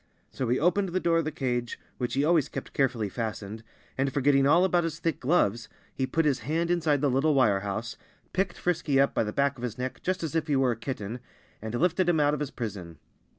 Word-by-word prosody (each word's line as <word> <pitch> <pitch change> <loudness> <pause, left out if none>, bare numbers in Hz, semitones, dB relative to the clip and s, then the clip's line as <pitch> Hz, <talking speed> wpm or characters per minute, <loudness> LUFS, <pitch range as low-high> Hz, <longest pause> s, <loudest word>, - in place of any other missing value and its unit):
So 130 -3 -3
he 125 - +2
opened 185 +4 +2
the 185 +2 0
door 170 -2 +2
of 165 - -1
the 155 - -2
cage, 120 -4 -2 0.2
which 125 0 -2
he 140 +2 +2
always 160 -4 +3
kept - - -7
carefully 125 -6 +1
fastened, 110 0 -5 0.4
and 135 0 +1
forgetting 140 0 +3
all 170 +5 +5
about 175 -2 +2
his 165 -1 -3
thick 165 -4 -2
gloves 120 - +1 0.2
he 130 - -1
put 160 +5 0
his 140 -4 +2
hand 165 +4 -1
inside 155 -5 +1
the 145 - +3
little 140 +3 +2
wire 105 -7 +4
house, 100 +3 -4 0.4
picked 185 -1 -1
Frisky 155 -6 0
up 140 - +3
by - - +1
the 105 - -3
back 140 +3 +1
of 120 - -9
his 115 -2 -4
neck, 125 +1 -4
just 185 -1 -2
as 160 - -3
if 165 -1 0
he 145 - +1
were 135 -2 +3
a - - -1
kitten, 115 -1 -5 0.4
and 110 +2 -4
lifted 180 +5 +2
him 165 -3 +3
out 145 0 +3
of 150 - -2
his 150 -2 -2
prison. 95 -8 -6
140 Hz, 240 wpm, -27 LUFS, 120-165 Hz, 0.4 s, all